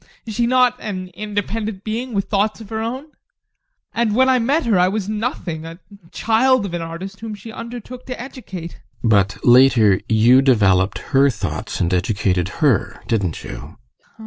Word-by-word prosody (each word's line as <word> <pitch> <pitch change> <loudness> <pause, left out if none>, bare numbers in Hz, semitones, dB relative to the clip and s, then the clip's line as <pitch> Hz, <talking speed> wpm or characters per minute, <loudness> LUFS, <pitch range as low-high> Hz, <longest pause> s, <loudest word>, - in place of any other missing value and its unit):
Is 220 - -6
she 235 +2 +1
not 250 0 +3
an 185 -3 -5
independent 210 0 -4
being, 230 +2 -4
with 195 - 0
thoughts 210 +2 0
of 220 -3 -11
her 220 - -3
own? 260 +7 -5 0.8
And 225 -2 0
when 260 +2 +4
I 255 -1 +4
met 280 +8 +1
her 215 -6 +3
I 180 - +4
was 200 0 -2
nothing 210 -7 -3
a 165 +1 -9 0.3
child 235 +1 +2
of 185 - -6
an 175 - -2
artist 175 +5 -7
whom 220 -1 -6
she 220 +3 -10
undertook 240 +2 -8
to 255 - -5
educate. 200 -10 -8 0.2
GUSTAV. 115 - +2
But 100 -1 +3
later 120 -5 +5
you 115 +4 +5
developed 100 -7 +3 0.2
her 140 +1 +5
thoughts 110 -3 -4
and 90 -2 0
educated 95 -1 0 0.2
her, 100 -8 +1
didn't 95 -8 -1
you? 80 +9 -9
195 Hz, 170 wpm, -20 LUFS, -, 0.8 s, later